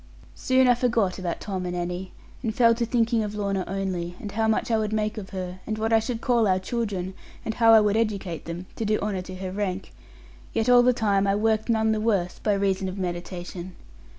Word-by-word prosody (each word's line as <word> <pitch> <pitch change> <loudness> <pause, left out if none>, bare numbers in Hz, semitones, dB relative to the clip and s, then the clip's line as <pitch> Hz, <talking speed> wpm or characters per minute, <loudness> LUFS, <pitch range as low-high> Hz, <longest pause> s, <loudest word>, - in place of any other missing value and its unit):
Soon 260 0 +3
I 245 - +7
forgot 235 -6 +1
about 175 -2 -3
Tom 190 -3 -4
and 180 0 -3
Annie; 180 +1 -4 0.3
and 225 -3 -2
fell 230 -2 +5
to 235 0 -1
thinking 230 -1 +2
of 210 -1 -3
Lorna 200 -2 -1
only; 180 -2 -3
and 205 - -6
how 220 +2 0
much 220 +2 +1
I 225 - +4
would 215 -1 -1
make 215 0 -1
of 190 - -9
her; 185 -1 -5
and 215 0 -2
what 220 +1 0
I 225 - +6
should 230 +1 -4
call 235 -3 +3
our 185 -1 +3
children; 190 -2 -3 0.3
and 220 - -1
how 230 0 +5
I 220 - +8
would 210 0 +2
educate 200 -7 -1
them, 170 +2 -6
to - - -2
do 215 0 +2
honour 200 -3 -2
to 185 0 -8
her 185 0 -5
rank; 195 -1 -3 0.6
yet 225 +1 0
all 245 0 +8
the 250 +1 +5
time 200 -4 +1
I 195 - +3
worked 220 +1 +1
none 220 -1 +3
the 215 -1 0
worse, 200 -6 0
by 210 - +1
reason 195 -1 0
of 185 - -7
meditation. 175 0 -5
205 Hz, 230 wpm, -25 LUFS, 185-225 Hz, 0.6 s, I